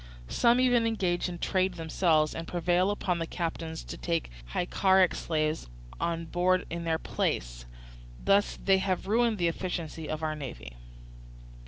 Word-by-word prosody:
Some 235 +1 +4
even 245 -2 +4
engage 185 -6 0
in 175 - -6
trade 185 0 0
themselves 160 -2 +2
and 165 0 -5
prevail 175 +2 +1
upon 185 -4 -1
the 165 - -2
captains 165 -2 -4
to - - -7
take 165 - -2 0.2
Hyccaric 190 - +3
slaves 155 - -1 0.3
on 165 0 -1
board 180 +2 +1
in 170 0 -4
their 165 -1 +1
place; - - -2 0.6
thus 200 +1 +3
they 195 -1 +5
have 185 -1 -1
ruined 225 +2 +2
the 175 -2 +2
efficiency 165 -3 -4
of 155 0 -3
our 155 -1 0
navy. 60 - -8
175 Hz, 150 wpm, -29 LUFS, 160-190 Hz, 0.6 s, they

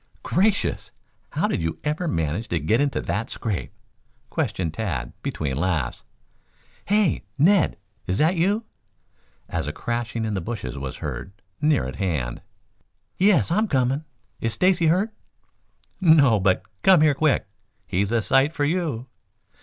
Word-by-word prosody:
"Gracious! 200 +4 +1 0.4
How - - 0
did - - -1
you 80 0 -2
ever 155 +4 -1
manage 80 - -1
to 85 - -1
get 110 - +2
into 145 -1 0
that 105 +3 -2
scrape?" 105 -6 -3 0.6
questioned 85 -4 -1
Tad 75 - -3
between 70 -4 -2
laughs. 80 -1 -1 0.8
"Hey, 205 -3 +2
Ned, 180 +6 +4 0.3
is 90 - 0
that 160 +7 +3
you?" 200 +7 +1 0.8
as 80 -3 -3
a - - -1
crashing 120 +4 -3
in 110 - -2
the 95 - -1
bushes 85 - -5
was 70 +1 -5
heard 70 +7 -5 0.3
near 150 - +3
at 65 +1 -6
hand. 75 -10 -2 0.8
"Yes. 190 -3 +4
I'm 215 +5 +2
coming. 135 -1 +1 0.4
Is 115 -1 -1
Stacy 180 -3 +3
hurt?" 195 +7 +2 0.9
"No, 150 - +6
but 95 -1 +2 0.2
come 185 -5 +6
here 155 -2 +5
quick. 145 +1 +2 0.4
Here's 100 +3 0
a 115 -2 +2
sight 135 +7 +3
for 145 -3 0
you!" 155 -7 -1
120 Hz, 145 wpm, -24 LUFS, -, 0.9 s, No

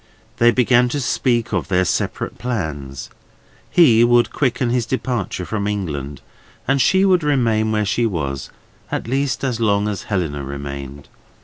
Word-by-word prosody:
They 120 - +5
began 125 0 +3
to 145 - -2
speak 120 -2 0
of - - -1
their 95 -1 +2
separate - - -2
plans. 75 - -4 0.6
He 120 -10 +5
would 120 0 +3
quicken 125 -3 0
his 120 -2 0
departure 120 -8 -2
from 105 0 -2
England, 75 -9 -4 0.5
and 135 +1 +2
she 190 +7 +4
would 185 -2 +4
remain 115 -7 +1
where 105 -1 +1
she 115 +4 +1
was, 70 -9 -4 0.4
at - - -3
least 135 +2 -1
as 125 -4 -1
long 105 -2 +2
as 100 -3 -3
Helena 80 -8 -2
remained. 70 0 -7
110 Hz, 150 wpm, -20 LUFS, 80-125 Hz, 0.6 s, They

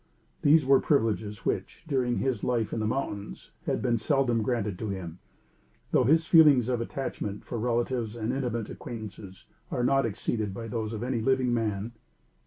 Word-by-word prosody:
These 150 0 +5
were 135 0 +6
privileges 110 -6 0
which, - - -2
during 130 -5 +1
his 130 -6 -1
life 120 -3 0
in - - -1
the 110 - 0
mountains, 105 - -4 0.2
had - - 0
been 120 -2 +2
seldom 130 -4 +1
granted 105 -5 -1
to 110 - -3
him, 90 -3 -5 0.7
though 125 - +4
his 160 +5 +4
feelings 150 -8 +6
of 120 -2 0
attachment 115 -5 -4
for 120 - -4
relatives 120 -1 -1
and 115 +1 -2
intimate 120 -5 -2
acquaintances 100 -5 -8 0.2
are 120 - -1
not 135 0 +3
exceeded 105 -1 -2
by 115 +1 -5
those 110 -1 -3
of 110 +1 -4
any 125 -2 -1
living 130 0 +2
man. 110 -1 -1
120 Hz, 170 wpm, -28 LUFS, 110-130 Hz, 0.7 s, were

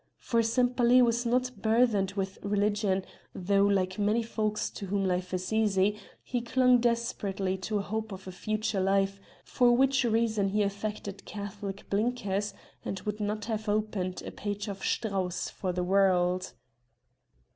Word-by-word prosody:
For 230 -1 +1
Sempaly 245 +1 +3
was 235 0 +1
not 250 +1 +1
burthened 220 -4 +2
with 195 -1 -3
religion, 205 -1 0 0.3
though, 200 +2 +2
like 190 -1 0
many 210 +3 +2
folks 215 -2 -2
to 200 - -7
whom 195 +1 0
life 180 0 -1
is 185 +3 -3
easy, 205 -2 +2 0.3
he 245 -1 -2
clung 250 +1 +4
desperately 230 -5 0
to 210 +3 -2
a 200 - -1
hope 220 +1 -3
in 190 - -5
a 190 0 -9
future 215 +2 -2
life, 195 +1 +1 0.2
for 245 -2 +3
which 270 +1 +3
reason 220 -3 +1
he 210 +1 +1
affected 200 0 -4
'Catholic 200 -1 -6
blinkers' 205 -2 -1 0.3
and 195 - -4
would 210 0 -4
not 210 0 -2
have 220 -1 -3
opened 205 -3 -1
a - - -5
page 205 0 -4
of 195 -1 -6
Strauss 190 -5 -1
for 185 - -3
the 180 0 -2
world. 185 -1 +2
205 Hz, 155 wpm, -29 LUFS, 195-225 Hz, 0.3 s, clung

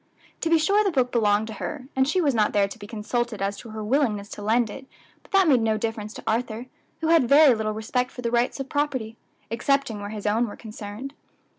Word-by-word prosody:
To 330 - -1
be 330 - +5
sure 400 +7 +3
the 400 - +2
book 255 -7 +1
belonged 210 -2 +2
to - - -5
her, 275 -4 -4
and 265 0 +3
she 360 +6 +2
was 290 -5 +2
not 215 -3 +2
there 200 -2 +3
to 215 +4 -10
be 205 - -9
consulted 230 +1 -2
as 195 +1 -1
to 235 - -10
her 215 0 -6
willingness 215 -4 0
to - - -8
lend 220 +1 +2
it; 265 +3 -10 0.3
but - - -23
that 390 -2 +5
made 260 -6 +5
no 220 -1 +1
difference 215 -1 -3
to - - -9
Arthur, 230 +1 -1 0.4
who 320 - 0
had 325 -8 +4
very 285 -1 +7
little 215 -1 -2
respect 250 +4 -1
for 245 - -9
the 235 - -1
rights 240 +3 +1
of 270 - -4
property, 265 -6 -2 0.4
excepting 260 -1 0
where 205 0 -6
his 210 -1 -7
own 225 +3 +2
were 205 - -8
concerned. 220 +4 -8
235 Hz, 240 wpm, -25 LUFS, 215-275 Hz, 0.4 s, very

